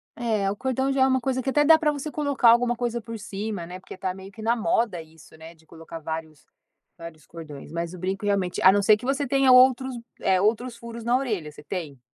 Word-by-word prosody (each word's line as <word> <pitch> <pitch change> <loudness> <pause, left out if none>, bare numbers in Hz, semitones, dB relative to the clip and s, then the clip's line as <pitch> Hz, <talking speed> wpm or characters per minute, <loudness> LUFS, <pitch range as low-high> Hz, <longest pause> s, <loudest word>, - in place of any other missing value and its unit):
É, 215 -5 -1
o - - -4
cordão 265 +3 -1
já 270 -1 0
é 265 - +4
um 260 0 +2
coisa 260 +1 -1
que 270 - -2
até 295 +2 +3
dá 315 +2 +6
para 305 -2 +2
você 295 +1 -5
colocar 285 -5 +2
alguma 240 +1 +4
coisa 240 0 -2
por 230 +1 -7
cima, 205 -3 -5
né, 180 +2 -9
porque 190 - -12
está 185 -1 -4
meio 190 +1 -11
que 220 - -12
na 230 +2 +1
moda 225 -4 0
isso, 160 0 -17
né, 160 +1 -12
de 160 0 -26
colocar 165 +1 -10
vários 160 -3 -7 0.5
vários 165 -3 -11
cordões, 150 -4 -10
mas 170 +1 -4
o - - -8
brinco 190 +3 -3
realmente, 195 -3 -1
a 190 - +8
não 205 +1 +2
ser 210 +1 +6
que 235 - -10
você 275 +2 0
tenha 270 0 +3
outros, 255 0 +5 0.3
eh, 190 -1 +2
outros 235 +4 0
furos 235 0 -9
na 240 +2 +2
orelha, 210 - -3
você 150 - -14
tem? 150 -5 -6
215 Hz, 240 wpm, -25 LUFS, 170-250 Hz, 0.5 s, a